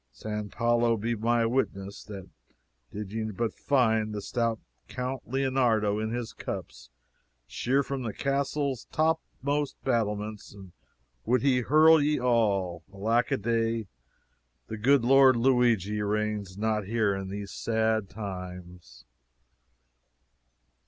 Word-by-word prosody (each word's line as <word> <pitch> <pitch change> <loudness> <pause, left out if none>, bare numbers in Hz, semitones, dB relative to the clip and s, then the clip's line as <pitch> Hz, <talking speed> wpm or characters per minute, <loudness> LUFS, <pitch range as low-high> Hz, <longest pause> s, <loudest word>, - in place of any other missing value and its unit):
San 105 - -5
Paolo 120 0 +2
be 115 +3 -1
my 115 +1 +1
witness 100 -5 -2
that 100 -3 -9 0.6
did 105 -1 -6
ye 110 0 -3
but 110 +2 -2
find 110 -6 +1
the 105 - -3
stout 115 -1 -1 0.3
Count 125 +1 -5
Leonardo 120 -6 +1
in 110 0 -2
his 120 0 -4
cups, - - -7 0.6
sheer 125 - 0
from 135 -1 -4
the 115 -3 -3
castle's 140 0 -1
topmost 150 -3 -1
battlements 105 -4 -2 0.7
would 125 +3 +1
he 130 -3 +3
hurl 155 +5 +6
ye 150 +1 +1
all! 100 -8 +1
Alack 110 +5 +1
a - - +1
day, 115 +1 0 0.8
the 110 - -6
good 135 +2 +4
Lord 135 0 +6
Luigi 115 -5 +2
reigns 105 -2 -2
not 110 -1 0
here 110 -2 +1
in 95 -1 -5
these 100 0 -6
sad 110 -2 0
times." 90 - -8
115 Hz, 120 wpm, -28 LUFS, 105-125 Hz, 0.8 s, hurl